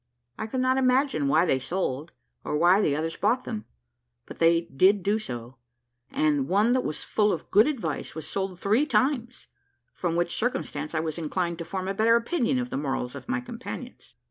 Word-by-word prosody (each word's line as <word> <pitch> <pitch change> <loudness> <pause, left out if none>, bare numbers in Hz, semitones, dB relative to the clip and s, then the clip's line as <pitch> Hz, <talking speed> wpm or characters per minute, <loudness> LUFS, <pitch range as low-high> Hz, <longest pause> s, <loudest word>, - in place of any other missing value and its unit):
I 220 - -3
could 255 +3 -2
not 260 +1 +2
imagine 255 - +2
why 155 +5 +4
they 135 -6 +2
sold, 155 -1 -3 0.3
or 150 - -1
why 175 +5 +5
the 145 -8 +2
others 160 +2 -2
bought 235 +5 +1
them; 215 -2 -5 0.6
but - - -11
they 165 0 +4
did 185 +5 +3
do 205 +2 +1
so; 120 - -7 0.5
and 145 -3 +1
one 210 +7 +3
that 255 0 +1
was 155 - -4
full 210 -1 +2
of 160 - -5
good 210 +6 +6
advice 220 - -3
was 160 -1 -6
sold 190 -1 -3
three 220 +11 +2
times, 245 0 0 0.5
from 170 -2 -2
which 175 0 0
circumstance 155 -10 -2
I - - +2
was 160 0 -3
inclined 170 +1 -2
to 170 - -4
form 185 +2 -4
a 195 - -1
better 225 +3 +4
opinion 255 +2 +1
of 250 0 -3
the - - -2
morals 135 -3 -2
of - - -10
my 250 0 0
companions. 245 +1 -9
190 Hz, 195 wpm, -26 LUFS, 160-235 Hz, 0.6 s, good